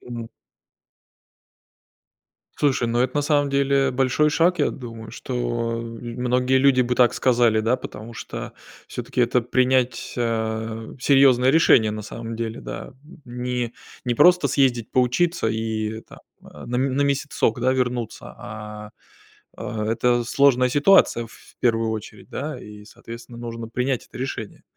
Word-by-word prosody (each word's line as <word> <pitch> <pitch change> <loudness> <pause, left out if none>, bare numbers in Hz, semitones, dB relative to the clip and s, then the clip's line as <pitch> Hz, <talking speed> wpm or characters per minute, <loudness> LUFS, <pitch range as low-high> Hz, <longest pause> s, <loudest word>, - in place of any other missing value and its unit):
Ну 120 -2 -7 2.3
Слушай, 135 -5 +1
ну, 120 +1 0
это 130 +2 0
на - - +2
самом 145 -1 +2
деле 140 -1 +2
большой 135 +4 +2
шаг, 170 +4 +2
я - - +3
думаю, 115 -4 -9
что - - -7 0.5
многие 125 +3 -1
люди 130 -1 +4
бы 125 0 0
так 125 -1 +4
сказали, 120 -3 +3
да. 115 +3 +2
Потому 115 -2 -9
что - - -7 0.3
всё-таки - - -5
это 125 - +3
принять, 130 +1 +1
а, 110 -1 -2
серьезное 130 -1 +5
решение 125 -8 +5
на 105 - -5
самом 115 +2 -7
деле, 115 0 -4
да. - - -7 0.3
Не 125 -1 -3 0.3
не 120 - +1
просто 180 +5 +5
съездить 125 -5 +1
поучиться, 130 +3 +1
и 110 0 -2
там - - -15 0.2
на 75 +12 -8
м 130 0 0
на 140 - +1
месяцок, 140 -4 0
да, 130 +2 +2
вернуться. 125 -3 -3
А 105 0 -9 0.7
а 110 -1 -4
это 120 +1 +2
сложная 125 0 +3
ситуация, 145 -5 +4
в 115 - -18
первую 115 -2 +2
очередь, 110 -2 -7
да, - - -5
и, 105 0 -11
соответственно, 120 +1 -11
нужно 115 -1 -6
принять 125 +2 -1
это - - -12
решение. 125 -5 -5
120 Hz, 140 wpm, -23 LUFS, 115-130 Hz, 2.3 s, серьезное